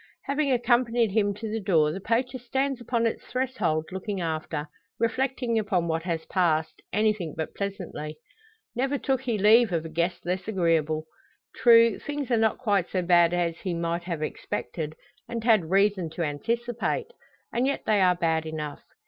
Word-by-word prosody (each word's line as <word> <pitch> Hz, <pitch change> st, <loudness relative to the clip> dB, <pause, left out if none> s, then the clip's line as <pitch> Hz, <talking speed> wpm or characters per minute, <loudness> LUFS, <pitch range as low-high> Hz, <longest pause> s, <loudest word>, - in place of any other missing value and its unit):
Having 280 Hz, 0 st, 0 dB
accompanied 240 Hz, -2 st, +2 dB
him 205 Hz, -1 st, +2 dB
to 220 Hz, +2 st, -6 dB
the 220 Hz, +1 st, -2 dB
door, 160 Hz, -7 st, +3 dB
the 185 Hz, -, -5 dB
poacher 250 Hz, +5 st, 0 dB
stands 265 Hz, +1 st, -1 dB
upon 235 Hz, 0 st, 0 dB
its 230 Hz, -, -1 dB
threshold 240 Hz, -12 st, -1 dB
looking 190 Hz, +1 st, -4 dB
after, 160 Hz, -2 st, -3 dB, 0.3 s
reflecting 245 Hz, 0 st, 0 dB
upon 190 Hz, -5 st, 0 dB
what 165 Hz, 0 st, 0 dB
has 165 Hz, -2 st, -3 dB
passed, 160 Hz, -4 st, 0 dB
anything 210 Hz, -5 st, 0 dB
but 160 Hz, -, -3 dB
pleasantly. 180 Hz, -6 st, -5 dB, 0.6 s
Never 270 Hz, +3 st, 0 dB
took 265 Hz, -1 st, 0 dB
he 240 Hz, -4 st, -1 dB
leave 215 Hz, +2 st, +5 dB
of 165 Hz, -2 st, -1 dB
a -, -, -5 dB
guest 170 Hz, +3 st, -2 dB
less 180 Hz, +2 st, -2 dB
agreeable. 165 Hz, -6 st, +1 dB, 0.5 s
True, 230 Hz, -2 st, +6 dB
things 290 Hz, -3 st, -4 dB
are 235 Hz, -, +4 dB
not 220 Hz, -1 st, +2 dB
quite 200 Hz, -7 st, +1 dB
so 185 Hz, -2 st, -1 dB
bad 175 Hz, -1 st, +5 dB
as 170 Hz, -2 st, -1 dB
he 180 Hz, -3 st, -3 dB
might 170 Hz, +1 st, -2 dB
have 165 Hz, -4 st, -3 dB
expected, 155 Hz, 0 st, -4 dB, 0.3 s
and 230 Hz, -1 st, -4 dB
had 215 Hz, -8 st, +3 dB
reason 195 Hz, -2 st, +2 dB
to 170 Hz, -, -1 dB
anticipate. 235 Hz, -, -2 dB, 0.4 s
And 245 Hz, +3 st, +1 dB
yet 280 Hz, -, -1 dB
they 210 Hz, -2 st, +3 dB
are 180 Hz, -1 st, +5 dB
bad 160 Hz, -2 st, 0 dB
enough. 150 Hz, -2 st, -5 dB
200 Hz, 170 wpm, -26 LUFS, 165-235 Hz, 0.6 s, True